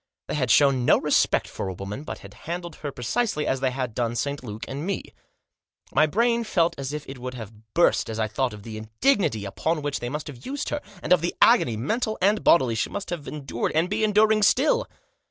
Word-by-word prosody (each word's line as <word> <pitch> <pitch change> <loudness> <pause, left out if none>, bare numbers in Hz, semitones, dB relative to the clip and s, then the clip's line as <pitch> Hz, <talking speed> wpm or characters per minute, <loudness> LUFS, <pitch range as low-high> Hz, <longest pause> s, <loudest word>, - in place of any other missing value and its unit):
They - - -5
had 130 -5 0
shown 135 0 +5
no - - +5
respect - - +2
for - - -5
a 95 - -4
woman, 100 +9 -6
but - - -6
had - - -11 0.2
handled 175 -1 -4
her 145 - -5
precisely 150 - -1
as 135 - 0
they 130 0 +1
had 125 -2 -3
done 120 0 -1
St. 140 +3 -2
Luke 110 -1 -6
and 140 +3 -5
me. 195 +1 -4 0.8
My 155 +3 +5
brain 235 +7 +2
felt 170 -6 +1
as 135 0 -3
if 150 0 -6
it 135 -1 -8
would 125 +1 -6
have 110 -2 -11
burst 170 -7 +3
as 110 - -4
I 110 - +1
thought 125 +4 -1
of 105 -1 -10
the 110 -1 -7
indignity 110 - +1
with 160 +11 -1
which 145 -1 -2
they 120 - -4
must 150 +2 -4
have 130 -4 -10
used 285 +2 -4
her, 295 - -2 0.2
and - - +4
of 180 - +3
the 175 - -2
agony, 175 - +5
mental 220 - -1
and 205 +3 +2
bodily, 130 -9 +5
she 110 - -1
must 200 -2 -5
have 170 -5 -5
endured, 135 -5 -3
and 165 +4 +1
be 220 +1 0
enduring 215 0 +4
still. - - +3
145 Hz, 225 wpm, -25 LUFS, 120-190 Hz, 0.8 s, shown